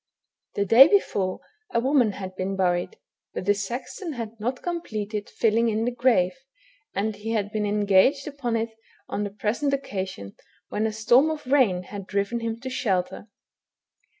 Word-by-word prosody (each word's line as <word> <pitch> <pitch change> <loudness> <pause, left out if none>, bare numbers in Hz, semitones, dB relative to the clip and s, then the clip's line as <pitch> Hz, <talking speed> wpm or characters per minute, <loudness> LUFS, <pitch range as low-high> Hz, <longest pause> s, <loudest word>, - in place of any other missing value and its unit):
The 200 - +1
day 240 +8 +9
before 200 - +1 0.3
a 235 - +2
woman 250 -4 +3
had 185 -1 -7
been 190 +1 -2
buried, 180 - 0 0.4
but - - -4
the 205 - +4
sexton 245 - -5
had 230 -4 -5
not 245 +4 -3
completed 215 - -4
filling 230 +1 +2
in 220 +1 0
the 245 - 0
grave, 235 -7 +2 0.6
and 210 +2 -1
he 220 +3 -4
had 205 -2 -1
been 210 -1 -1
engaged 205 +7 +3
upon 275 -6 -3
it 225 0 -1 0.4
on 205 - -2
the 205 - -2
present 225 +8 0
occasion, 190 - -5 0.3
when 215 +1 0
a - - -2
storm 240 +7 +4
of 310 -3 -4
rain 250 -10 +3
had 200 +1 -8
driven 200 +4 -1
him 230 0 -3
to 260 - -5
shelter. 200 -6 -1
220 Hz, 165 wpm, -25 LUFS, 200-250 Hz, 0.6 s, day